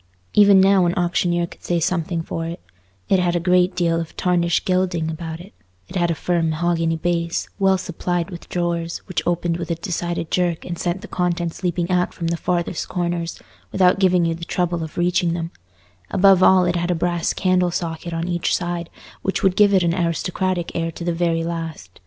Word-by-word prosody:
Even 200 -2 +7
now 190 -1 +5
an 175 - 0
auctioneer 175 -1 +1
could - - -15
say 175 -1 0
something 165 0 -1
for 165 0 -4
it: 170 +1 -6 0.5
it 190 - +3
had 175 -1 +1
a - - +2
great 180 +1 +2
deal 170 -2 +1
of 165 - -9
tarnished 175 -2 +1
gilding 180 -3 0
about 160 0 -6
it; 190 +4 -13 0.4
it - - -10
had 175 -2 +1
a 165 - 0
firm 170 0 0
mahogany 165 0 0
base, 170 0 -1
well 190 -1 +4
supplied 175 0 -3
with 170 - -10
drawers, 170 -1 -2
which 185 - -2
opened 175 -1 0
with 170 -1 -5
a 170 - 0
decided 170 -1 -3
jerk 175 -2 0
and 175 -1 -5
sent 175 +2 -2
the 220 - -9
contents 175 -1 -2
leaping 175 -1 -1
out 180 0 +1
from 165 -1 -2
the 170 - 0
farthest 175 0 -2
corners, 170 -2 -2 0.3
without 185 0 +3
giving 180 -2 +3
you 165 - +1
the 170 +1 -8
trouble 175 -1 -1
of 160 - -8
reaching 175 0 +1
them; 165 -1 -4 0.6
above 195 -1 +5
all, 185 -1 +6
it 175 0 0
had 175 0 -1
a 180 - +2
brass 175 0 0
candle 185 -1 +2
socket 170 0 -4
on 165 +1 -2
each 175 -1 0
side, 175 -1 -3 0.3
which 190 - -2
would 190 -2 +3
give 205 -1 +5
it 190 -2 +4
an 170 -1 +2
aristocratic 175 +1 -1
air 165 0 -1
to 165 - -8
the 175 0 0
very 165 -1 0
last. 165 - -6
175 Hz, 205 wpm, -21 LUFS, 170-180 Hz, 0.6 s, Even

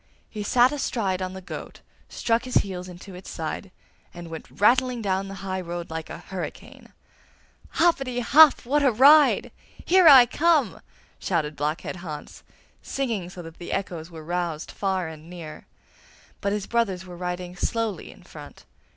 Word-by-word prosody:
He 210 - -5
sat 245 +5 +4
astride 215 -10 -2
on 185 0 -3
the 190 0 -9
goat, - - -8 0.3
struck 230 +1 0
his 255 - -5
heels 180 -2 -6
into 180 +2 -11
its 180 +1 -10
side, 165 +4 -5 0.5
and 170 -1 -9
went 160 - -8
rattling 250 +3 +3
down 195 -2 -1
the 195 - -7
high 190 -1 -2
road 175 -1 -6
like 160 0 -5
a - - -7
hurricane. 180 +1 -8 0.8
'Hoppetty 270 -7 +2
hop! 285 +3 +6
what 290 +4 +2
a 275 -3 +4
ride!' 285 +6 +6 0.3
Here 365 -1 +5
I 265 -5 +10
come!' 300 - +1 0.4
shouted 155 -5 -1
Blockhead 150 +5 -3
Hans, 155 -4 -8 0.4
singing 230 -10 -3
so 180 -1 -9
that 165 0 -12
the 175 - -7
echoes 170 -4 -4
were 160 -2 -11
roused 170 -2 -3
far 190 -3 -2
and 160 0 -11
near. 170 -4 -10 0.7
But 200 - 0
his 205 -1 -2
brothers 200 -6 -1
were 180 -1 -10
riding 180 0 -5
slowly 220 -1 -2
in - - -15
front. - - -13
190 Hz, 160 wpm, -25 LUFS, 175-240 Hz, 0.8 s, I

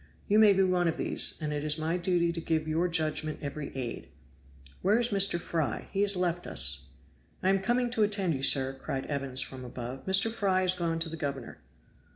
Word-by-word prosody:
You 210 +2 +3
may 215 -2 +7
be 195 0 +2
one 180 -2 +1
of 165 - -1
these; - - +4
and 150 0 -2
it 145 0 -3
is 150 0 +1
my 160 +2 -1
duty 175 -1 0
to 165 0 -5
give 160 -1 -1
your 165 +3 0
judgment 155 -2 -1
every 145 +1 -5
aid. 125 -3 -5 0.7
Where 200 +4 +3
is 240 0 +1
Mr. 195 -4 +3
Fry? 160 -8 -3
He 195 - -1
has 200 -1 +4
left 175 -1 -1
us." - - +2 0.6
"I 185 - +2
am 195 0 +3
coming 240 +4 0
to 230 - -1
attend 200 -4 +1
you, 135 - -4
sir," 135 -1 +3
cried 135 0 -5
Evans 135 -2 -3
from 130 -1 -6
above. 125 +3 -8
"Mr. 195 +4 +2
Fry 195 -4 0
is 185 0 +2
gone 170 -2 -2
to 165 0 -3
the 165 - -7
governor." 140 -5 -5
170 Hz, 210 wpm, -29 LUFS, 145-190 Hz, 0.7 s, may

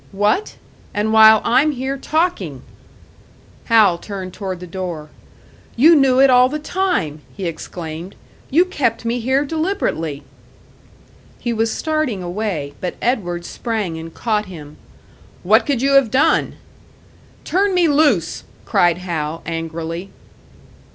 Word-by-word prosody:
"What? 210 - 0 0.4
And 215 +1 0
while 220 -1 +7
I'm 290 +5 +3
here 265 +1 -3
talking!" 325 +6 -2 1.0
Hal 215 -7 +4
turned 190 -2 -7
toward 190 -3 -5
the 180 - -8
door. 170 -4 -6 0.6
"You 315 +8 +6
knew 270 -3 +4
it 270 0 +6
all 250 0 +5
the 300 - -3
time!" 305 - -2 0.2
he 195 - -4
exclaimed. 165 +1 -6 0.3
"You 335 +6 +4
kept 250 - -1
me 235 +2 -1
here 260 +4 +1
deliberately!" 290 - -2 1.1
He 240 - -3
was 225 0 0
starting 310 - -2
away, 175 -6 -3
but 180 - -3
Edward 175 -8 -1
sprang 210 -9 -3
and 165 0 -8
caught 215 +2 -1
him. 150 -5 -11 0.7
"What 215 +6 +4
could 270 -4 0
you 275 - +2
have 275 -4 +5
done?" 295 +8 +2 0.9
"Turn 385 +2 +1
me 350 -2 +4
loose!" 285 - +2 0.2
cried 175 -1 +2
Hal, 165 -3 -4
angrily. 165 +2 -5
220 Hz, 130 wpm, -19 LUFS, 175-275 Hz, 1.1 s, while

